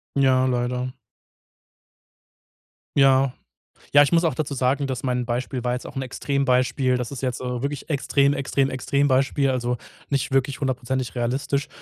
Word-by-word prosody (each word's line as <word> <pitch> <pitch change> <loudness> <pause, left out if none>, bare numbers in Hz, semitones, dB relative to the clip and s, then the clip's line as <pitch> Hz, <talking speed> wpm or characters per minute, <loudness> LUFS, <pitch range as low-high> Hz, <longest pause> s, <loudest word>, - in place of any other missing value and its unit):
Ja, 130 -2 +4
leider. 125 0 -1 2.0
Ja. 135 -1 +5 0.6
Ja, 145 - +8
ich 145 - +2
muss 170 0 +4
auch 160 - +1
dazu 150 -3 -3
sagen, 135 +2 +1
dass 130 -1 -4
mein 125 -2 0
Beispiel 125 +1 -2
war 125 0 0
jetzt 125 - -5
auch - - -11
'n 135 - -1
Extrembeispiel. 130 -1 +1
Das 125 +2 -4
ist 135 - -6
jetzt, 125 -1 -2
äh, 125 -1 -3
wirklich 140 -1 -4
Extrem 140 -1 +2
Extrem 135 0 0
Extrembeispiel, 135 +1 +1
also 125 -1 -1 0.3
nicht 140 -1 -1
wirklich 135 +1 +1
hundertprozentig 130 -1 -2
realistisch. 135 +4 -1
130 Hz, 150 wpm, -23 LUFS, 125-140 Hz, 2.0 s, Ja